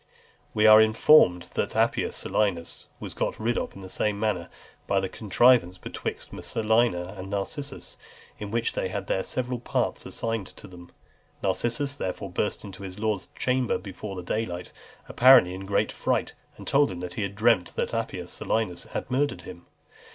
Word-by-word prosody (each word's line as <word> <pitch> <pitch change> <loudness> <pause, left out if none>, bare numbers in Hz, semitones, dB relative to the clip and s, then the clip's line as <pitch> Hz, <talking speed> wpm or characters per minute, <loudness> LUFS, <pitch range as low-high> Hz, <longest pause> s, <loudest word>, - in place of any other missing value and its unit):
We 105 0 +3
are 110 0 +9
informed, 110 - +5
that - - -2
Appius - - +1
Silanus 85 -5 -1
was - - -7
got - - -2
rid 115 +2 0
of - - -3
in 95 - -10
the - - -7
same 100 +2 -1
manner, 105 -6 -1 0.4
by 100 - +1
a 95 0 +1
contrivance 110 -2 +3
betwixt - - -6
Messalina 110 -5 0
and 95 0 -8
Narcissus, 135 +8 -4 0.4
in 105 - -5
which 115 +2 -1
they - - -1
had 100 +1 -4
their 95 - 0
several 125 -1 -3
parts 120 - -1
assigned 115 -4 -3
them. 90 -2 -13 0.5
Narcissus 120 +8 0
therefore 95 -5 -4
burst 105 +4 -2
into 100 -2 -9
his 95 -1 -7
lord's 105 -4 -1
chamber 125 -1 +1
before 95 0 -7
daylight, 90 -2 -3 0.4
apparently 125 -8 +6
in 95 +1 -7
great 100 - +1
fright, - - -1 0.2
and - - -10
told 145 -1 +3
him 90 -2 -6
that 90 -1 -6
he 105 - -4
had 100 0 -3
dreamt 110 -4 +2
that - - -2
Appius - - -3
Silanus 90 -6 -2
had - - -6
murdered 130 -8 0
him. 85 - -11
100 Hz, 165 wpm, -26 LUFS, 90-115 Hz, 0.5 s, are